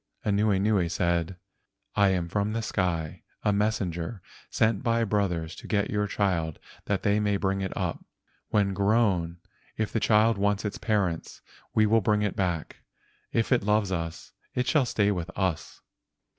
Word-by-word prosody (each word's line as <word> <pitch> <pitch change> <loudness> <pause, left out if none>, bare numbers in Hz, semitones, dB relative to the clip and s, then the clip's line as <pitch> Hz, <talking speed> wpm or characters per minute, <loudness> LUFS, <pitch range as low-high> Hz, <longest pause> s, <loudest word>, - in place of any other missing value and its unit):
Anuenue 100 -2 +2
said: 85 0 0 0.6
"I 100 -1 +5
am 90 -3 0
from 105 +4 -1
the 115 0 -2
sky, 85 -6 -2 0.2
a 105 - +3
mes¬ 105 +2 +2 0.2
senger 85 +5 -5 0.3
sent 110 -2 +1
by 115 -1 +1
my - - +3
brothers 95 -6 -1
to - - -10
get 100 -2 0
your 105 -1 0
child 90 -7 0 0.3
that 100 -2 -1
they 105 0 +3
may 105 -1 +1
bring 95 0 -1
it 95 - -2
up. - - -2 0.5
When 100 -2 +2
grown, 100 -4 +2 0.4
if 110 -1 -2
the 110 - +2
child 110 0 +3
wants 100 +1 +1
its 105 - -3
parents, 100 -7 -1 0.3
we 110 - +5
will 110 +1 +4
bring 105 +1 +2
it 105 - -1
back. 90 -6 -2 0.5
If 115 +2 0
it 125 - +4
loves 105 -1 +1
us 85 -2 -4 0.2
it 125 - +1
shall 140 -2 +2
stay 105 -3 +2
with 90 -2 -3
us." 95 -4 -2
100 Hz, 170 wpm, -27 LUFS, 90-105 Hz, 0.6 s, I